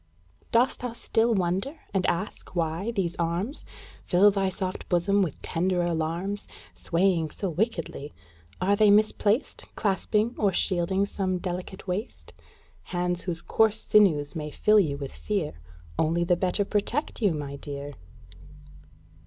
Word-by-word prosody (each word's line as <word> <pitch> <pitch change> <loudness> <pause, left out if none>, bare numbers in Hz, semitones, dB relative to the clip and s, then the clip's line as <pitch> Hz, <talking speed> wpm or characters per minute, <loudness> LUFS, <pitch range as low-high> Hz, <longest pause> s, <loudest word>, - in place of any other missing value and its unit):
Dost 245 +1 +3
thou 245 -2 -4
still 230 0 +1
wonder, 190 - 0 0.2
and 190 -2 +1
ask 185 +1 -3
why 165 +5 -1
these 195 -6 -1
arms 175 - -2 0.4
Fill 200 +3 +5
thy 195 -1 0
soft 185 0 -5
bosom 195 +3 +3
with 170 -7 -2
tender 180 +1 0
alarms, 175 +4 -2 0.3
Swaying 170 -2 +1
so 190 +4 -4
wickedly? 165 - -2 0.5
Are 195 +2 +3
they 210 0 +5
misplaced 215 +3 +2
Clasping 210 +2 +1
or 200 -2 +3
shielding 190 +2 +1
some 190 -2 -1
delicate 180 +1 -5
waist? 190 +6 -4 0.5
Hands 180 0 -1
whose 170 -2 -4
coarse 220 +4 +2
sinews 150 -9 +4
may 150 -1 -3
fill 210 +8 +4
you 150 -7 +1
with 140 -1 -6
fear 200 -8 -2 0.5
Only 165 +2 +2
the 175 +1 +3
better 185 +3 0
protect 225 +8 -1
you, 200 -7 +3
my 140 -2 -5
dear! 140 0 -6
185 Hz, 135 wpm, -27 LUFS, 170-205 Hz, 0.5 s, Fill